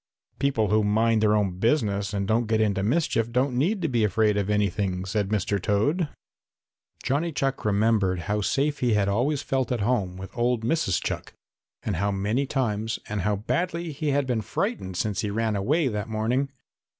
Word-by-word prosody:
"People 130 -7 +1
who 105 +1 +3
mind 110 +2 +2
their 105 -1 +4
own 95 -4 0
business 100 -5 +1
and 100 -1 -2
don't 115 +2 +1
get 110 0 +1
into 105 -3 +1
mischief 115 -1 +1
don't 125 +2 +1
need 180 - +1
to - - +2
be 120 -6 +1
afraid 105 +1 +2
of 100 -1 -1
anything," 100 -2 0
said 100 0 -1
Mr. 100 -1 0
Toad. 145 - +1 0.9
Johnny 155 +6 0
Chuck 135 -2 -1
remembered 100 -3 +2
how 105 +5 -1
safe 145 +7 0
he 120 -4 +2
had 100 -2 +2
always 130 +8 0
felt 130 -2 -1
at 120 -4 0
home 100 -5 0
with 95 +1 -9
old 120 -1 +1
Mrs. 120 - +1
Chuck - - -4 0.5
and - - -2
how 100 +3 +1
many 105 +8 0
times 115 -5 -1
and 105 -1 -2
how 105 +3 +1
badly 170 - -2
he 150 +1 -4
had 140 0 +1
been 120 -3 0
frightened 95 -3 -3
since 100 0 -1
he 105 - -2
ran 110 +1 0
away 140 - +1
that 105 -2 -3
morning. 115 +6 0
110 Hz, 185 wpm, -26 LUFS, 100-130 Hz, 0.9 s, their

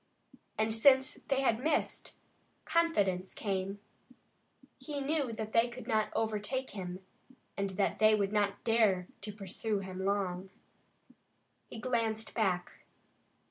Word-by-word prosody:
And 220 0 +2
since 265 +4 +5
they 270 -1 +2
had 245 -2 +1
missed, 315 - 0 0.5
confidence 205 - +1
came. 195 -1 -2 1.0
He 295 -2 -5
knew 280 -2 0
that 220 -1 -5
they 230 +1 +5
could 250 +1 -9
not 215 -1 +2
overtake 225 +4 -1
him, 185 -1 -6 0.5
and 200 0 -1
they 215 +2 +3
would 200 -1 0
not 205 -1 +1
dare 215 -6 +3
to 210 +2 -5
pursue 205 +1 -2
him 190 -1 -5
long. 190 -2 -1 1.2
He - - -8
glanced 225 -2 -1
back. 185 -6 0
215 Hz, 120 wpm, -32 LUFS, 195-235 Hz, 1.2 s, since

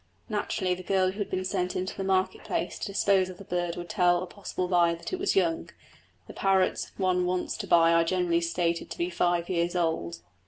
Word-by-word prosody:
Naturally, 200 -3 -1
the 180 - -6
girl 185 0 +1
who 200 - -10
had 205 - -2
been 185 0 -2
sent 180 -1 -1
into 185 +1 -3
the 195 - -4
market 190 -1 0
place - - -3
to - - -3
dispose 195 -1 +2
of 185 - -9
the 200 - -10
bird 175 -2 -2
would 175 0 -6
tell 175 0 +3
a - - -4
possible 185 -1 -4
buyer 175 -2 +3
that 170 - -8
it 370 - -1
was 390 +2 +1
young; 335 -4 +1 0.6
the - - -11
parrots 190 -1 +1
one 185 -2 +1
wants 180 0 -1
to - - -5
buy 165 -1 +5
are 165 0 +5
generally 170 -1 +1
stated 170 0 -1
to - - -7
be 175 +1 -1
five 175 0 +1
years 175 -1 0
old. 125 - -1
180 Hz, 225 wpm, -28 LUFS, 170-190 Hz, 0.6 s, buy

